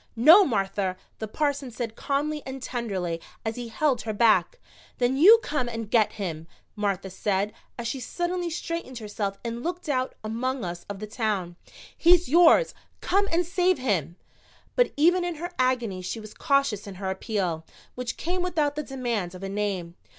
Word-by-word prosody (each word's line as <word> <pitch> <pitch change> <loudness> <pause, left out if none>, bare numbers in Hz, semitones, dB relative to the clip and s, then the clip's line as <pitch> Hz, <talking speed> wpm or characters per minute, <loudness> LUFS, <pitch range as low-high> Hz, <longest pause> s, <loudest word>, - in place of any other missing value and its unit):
"No, 315 - +8
Martha," 195 - -1 0.2
the 220 - -3
parson 285 +2 -1
said 230 -1 -5
calmly 295 +3 -1
and 265 0 -6
tenderly, 195 -10 -3 0.2
as 220 0 -1
he 245 -1 -5
held 250 +2 +1
her 220 -1 -3
back. 230 - +3 0.4
"Then 250 +1 +2
you 385 +11 +9
come 255 -5 -1
and 225 -2 -5
get 220 -3 +4
him," 165 -5 -5 0.3
Martha 195 -2 -2
said, 200 +2 -1 0.2
as 235 -1 -3
she 265 - -3
suddenly 350 +5 -2
straightened 335 -5 -4
herself 205 -2 -3
and 235 0 -3
looked 350 +3 -4
out 260 -3 0
among 235 +2 -2
us 175 0 -6
of 200 - -4
the 215 - -5
Town. 210 -6 -2 0.4
"He's 345 0 +5
yours 345 - +6 0.3
come 400 +2 +1
and 345 +2 +2
save 360 +1 +2
him!" 175 - -1 0.6
But - - +3
even 350 +4 +4
in 350 -1 -2
her 345 +3 -5
agony 240 -7 +1
she 185 +5 -4
was 215 -1 -10
cautious 275 -8 +1
in 195 - -7
her 190 0 -3
appeal, 190 -5 -2 0.3
which 250 -1 -4
came 360 +2 -2
without 320 -5 0
the 300 - -1
demand 240 -10 -3
of 185 - -9
a 195 - -3
name. 195 -4 -2
240 Hz, 175 wpm, -26 LUFS, 200-300 Hz, 0.6 s, you